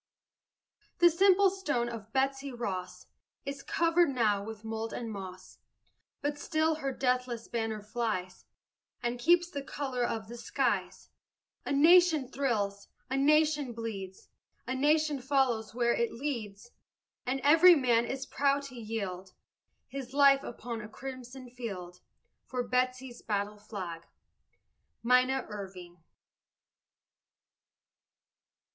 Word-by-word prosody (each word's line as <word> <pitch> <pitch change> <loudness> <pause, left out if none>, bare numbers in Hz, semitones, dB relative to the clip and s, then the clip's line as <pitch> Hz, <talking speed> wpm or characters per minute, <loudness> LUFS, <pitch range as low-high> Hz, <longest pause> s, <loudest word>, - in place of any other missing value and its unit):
The 345 0 +6
simple 385 +2 +5
stone 295 -11 -1
of 225 -2 -7
Betsy 270 +1 0
Ross 185 -6 -5 0.4
Is 280 0 -5
covered 335 +1 +2
now 215 -6 +1
with 220 0 -8
mold 225 0 -4
and 230 -2 -4
moss, 185 -2 -9 0.6
But 290 0 -1
still 315 +1 +1
her 275 - -1
deathless 250 -2 -1
banner 225 -2 -3
flies, 210 -5 -3 0.6
And 240 0 -1
keeps 345 +6 +3
the 285 - -4
color 270 -2 -3
of 225 -3 -2
the 240 +2 -8
skies. - - -1 0.6
A - - -1
nation 320 0 +5
thrills, 205 -8 -1 0.2
a - - +1
nation 295 -1 +3
bleeds, 200 -5 -6 0.4
A 255 - -2
nation 295 +1 +2
follows 245 -6 +1
where 235 -1 +2
it 235 - 0
leads, 235 -5 -5 0.6
And 265 +2 0
every 330 +5 +8
man 240 -5 +3
is 265 +2 -4
proud 280 0 +1
to 275 -2 -9
yield 200 -5 -5 0.5
His 265 -1 -7
life 275 -1 +6
upon 235 -2 -6
a 210 - -9
crimson 255 +1 -8
field 195 -8 -7 0.5
For 250 -2 -3
Betsy's 255 0 -1
battle 205 0 -2
flag! 185 -6 -7 1.0
MINNA 250 +2 +3
IRVING. 185 -4 -8
245 Hz, 120 wpm, -30 LUFS, 220-280 Hz, 1.0 s, every